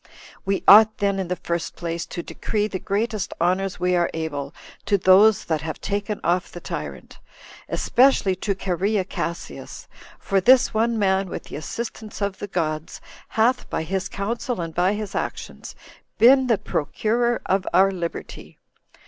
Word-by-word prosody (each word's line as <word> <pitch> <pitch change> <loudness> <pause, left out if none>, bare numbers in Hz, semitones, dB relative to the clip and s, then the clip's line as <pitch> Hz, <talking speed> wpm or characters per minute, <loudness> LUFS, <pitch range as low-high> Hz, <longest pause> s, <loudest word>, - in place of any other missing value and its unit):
We 195 0 -1
ought, 215 +2 +8
then, 200 -1 0
in 190 - -2
the 180 - -1
first 170 -2 -4
place, 170 -1 -4
to 170 - -6
decree 210 -1 -2
the 190 -3 -5
greatest 210 0 -2
honors 185 +3 0
we 180 0 +1
are 175 -1 +2
able 145 -3 -4 0.4
to 200 0 +3
those 195 +3 +5
that 160 -2 -1
have 160 -1 -5
taken 205 +1 -3
off 175 +1 0
the 175 - -8
tyrant, - - -7 0.5
especially 250 -7 +3
to 200 +1 -2
Cherea 190 +2 -1
Cassius; 170 -2 -6 0.3
for 195 -2 0
this 255 +6 +5
one 230 +1 +1
man, 190 -2 +1
with - - -6
the - - -10
assistance 220 - -6
of 200 -1 -2
the 205 - -5
gods, 155 -4 -3 0.3
hath, 240 +3 +1
by - - -2
his 190 +3 -3
counsel 230 +3 -3
and 165 -1 -4
by 180 +4 +2
his 210 -2 -5
actions, - - -5 0.4
been 260 +2 +6
the 230 -3 +3
procurer 235 +10 -1
of 190 0 0
our 190 +3 +4
liberty. 170 -3 -6
195 Hz, 160 wpm, -23 LUFS, 175-215 Hz, 0.5 s, ought